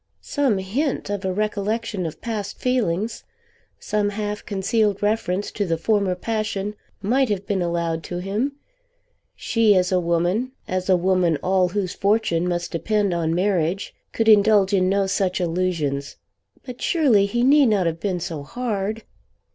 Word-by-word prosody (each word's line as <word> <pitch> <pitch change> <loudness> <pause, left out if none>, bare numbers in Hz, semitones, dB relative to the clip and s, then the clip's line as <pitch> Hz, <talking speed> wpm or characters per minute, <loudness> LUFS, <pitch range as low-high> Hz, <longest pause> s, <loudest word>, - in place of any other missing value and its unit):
Some 275 -8 +1
hint 210 +5 -2
of 205 -1 -3
a 190 - 0
recollection 210 -1 -2
of 155 - -9
past 210 -3 -4
feelings, 225 -5 -1 0.5
some 210 -1 -1
half 210 0 -4
concealed 205 0 0
reference 205 -2 0
to 205 - -2
the 165 -4 -1
former 200 0 +1
passion 210 0 -2 0.3
might 255 +5 +2
have 200 -1 -2
been 200 -3 -1
allowed 170 -1 -1
to 175 - -5
him! 205 +10 -2 0.8
She 225 -3 +3
as 180 0 +2
a 185 - +3
woman, 175 +9 0
as 185 0 -2
a 185 - +5
woman 180 -3 +2
all 185 0 +3
whose 190 -1 -2
fortune 195 -4 +1
must 175 -1 -2
depend 205 +2 0
on 165 -1 0
marriage, 185 0 0 0.2
could 225 - -1
indulge 205 -2 +5
in 185 -1 +3
no 200 0 +2
such 190 -1 0
allusions; 165 -6 -1 0.5
but 250 -2 -9
surely 250 - +3
he 240 +4 0
need 280 +1 +6
not 205 -5 +2
have 165 0 -1
been 185 -2 -1
so 165 -3 -5
hard! 215 - -3
200 Hz, 155 wpm, -22 LUFS, 180-215 Hz, 0.8 s, need